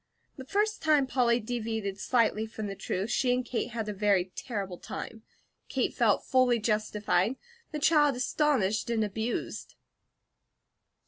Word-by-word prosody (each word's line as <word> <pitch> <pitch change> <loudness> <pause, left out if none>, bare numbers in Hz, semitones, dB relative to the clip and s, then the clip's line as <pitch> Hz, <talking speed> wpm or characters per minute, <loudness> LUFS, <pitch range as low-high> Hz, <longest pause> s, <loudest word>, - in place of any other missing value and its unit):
The 265 - -9
first 420 +7 0
time 305 -3 +4
Polly 245 -2 +2
deviated 220 -3 -3
slightly 225 -3 +1
from 220 -1 -6
the 200 - -4
truth, 195 +3 -3
she 250 0 +2
and 250 0 -2
Kate 245 0 -2
had 225 -2 -4
a 210 - -2
very 195 -2 +1
terrible 195 -7 -4
time. 225 - -7 0.5
Kate - - 0
felt - - +2
fully 255 -2 +3
justified; 215 -1 0 0.4
the 305 - -3
child 295 -2 +4
astonished 245 -6 +1
and 225 -2 +1
abused. 220 +3 -4
230 Hz, 140 wpm, -29 LUFS, 210-255 Hz, 0.5 s, time